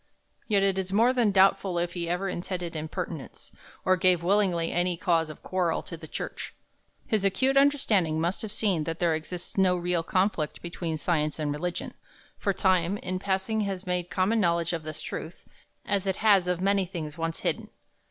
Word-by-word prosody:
Yet 200 -3 +3
it 195 -1 +2
is 190 0 -4
more 230 +5 +4
than 240 -4 +3
doubtful 190 -1 +3
if 175 0 -1
he 170 -2 -3
ever 180 +3 -1
intended 175 -2 -4
impertinence, 155 -1 -6 0.3
or 185 - +5
gave 180 -2 +3
willingly 180 -3 +2
any 175 0 0
cause 165 -2 +1
of 155 - -10
quarrel 180 -3 0
to 170 - -7
the 160 -1 -11
Church. - - -6 0.5
His 215 -3 0
acute 230 +8 +2
understanding 220 - +3
must 170 +4 -1
have 220 - -5
seen 200 -7 +1
that 165 0 -3
there 170 -2 +2
exists 175 +4 -5
no 185 -1 +4
real 175 -1 0
conflict 185 -3 0
between 170 -2 -3
science 155 -2 0
and 150 -2 -1
religion; 170 +4 -3 0.5
for 200 - +1
time, 185 0 +2
in 185 -2 -3
passing, 195 +3 0
has 195 -2 -3
made 180 -1 -1
common 195 +5 +1
knowledge 170 -3 +1
of 165 - -2
this 155 0 -6
truth, 165 - -7 0.4
as 200 -1 0
it 190 - +1
has 200 -4 +4
of 180 0 0
many 195 -1 +2
things 165 -4 -6
once 165 0 -2
hidden. - - -1
180 Hz, 185 wpm, -27 LUFS, 170-195 Hz, 0.5 s, or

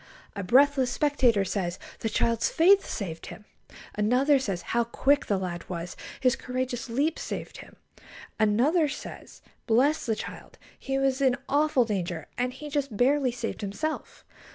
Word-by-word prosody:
A 200 - -3
breathless 265 +5 +4
spectator 250 -9 +2
says: 180 -2 -2 0.2
"The 225 - -2
child's 230 +1 +1
faith 390 +4 +5
saved 165 -6 -5
him." 210 - -10 0.5
Another 255 +7 +3
says: 195 -9 -3
"How 235 0 +3
quick 275 +5 +1
the 200 - +1
lad 175 -2 -5
was! 170 -1 -5 0.2
His 255 -1 +3
courageous 255 -1 -4
leap 285 +7 0
saved - - -6
him." - - -12 0.6
Another 265 +10 +3
says: - - -9 0.2
"Bless 265 +6 +2
the 220 - +1
child! - - -8 0.2
He 270 0 -2
was 270 0 +1
in 260 -2 +3
awful 285 -3 +3
danger, 175 -7 -3
and 250 0 -1
he 270 +4 -9
just 280 -6 -2
barely 265 +2 +3
saved 235 -2 -5
himself." 215 +11 -4
250 Hz, 155 wpm, -27 LUFS, 210-280 Hz, 0.6 s, faith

